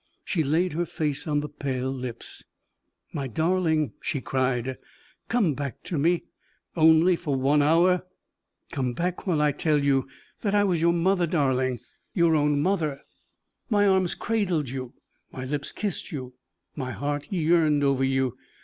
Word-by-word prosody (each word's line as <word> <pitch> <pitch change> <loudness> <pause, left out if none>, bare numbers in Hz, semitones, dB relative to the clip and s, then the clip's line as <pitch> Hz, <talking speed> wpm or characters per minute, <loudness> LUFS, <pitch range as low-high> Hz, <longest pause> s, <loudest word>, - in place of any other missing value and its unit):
She 165 -5 0
laid 160 +4 +1
her 170 +2 -1
face 150 -2 -2
on 150 -1 +1
the 150 - -4
pale 130 -3 -3
lips. 125 -3 -7 0.7
"My 140 -2 -3
darling," 160 - +1
she 140 - -2
cried, 130 -1 -1 0.5
"come 220 -10 +2
back 140 -1 -5
to 165 - -3
me, 170 +4 +2 0.5
only 160 +2 +5
for 155 -5 -2
one 140 +3 +3
hour: 175 +4 +3 0.6
come 130 -3 -1
back, 180 +8 -3
while 160 -5 +2
I 150 - +3
tell 150 0 +1
you 135 -1 +2 0.3
that 205 -1 0
I 205 - +4
was 180 -5 +1
your 170 +1 +4
mother, 175 +1 +2
darling 130 -6 +1 0.3
your 170 -3 +4
own 150 -1 +2
mother. 155 -6 0 0.7
My 205 -3 +3
arms 190 -2 +2
cradled 185 - -1
you, 130 -1 -6 0.4
my 130 - -6
lips 140 +1 -3
kissed 205 -4 -4
you, 130 -4 -6 0.4
my 130 -3 -4
heart 145 0 -3
yearned 160 -4 +3
over 135 -1 +2
you. 130 -2 +1
150 Hz, 155 wpm, -26 LUFS, 135-175 Hz, 0.7 s, only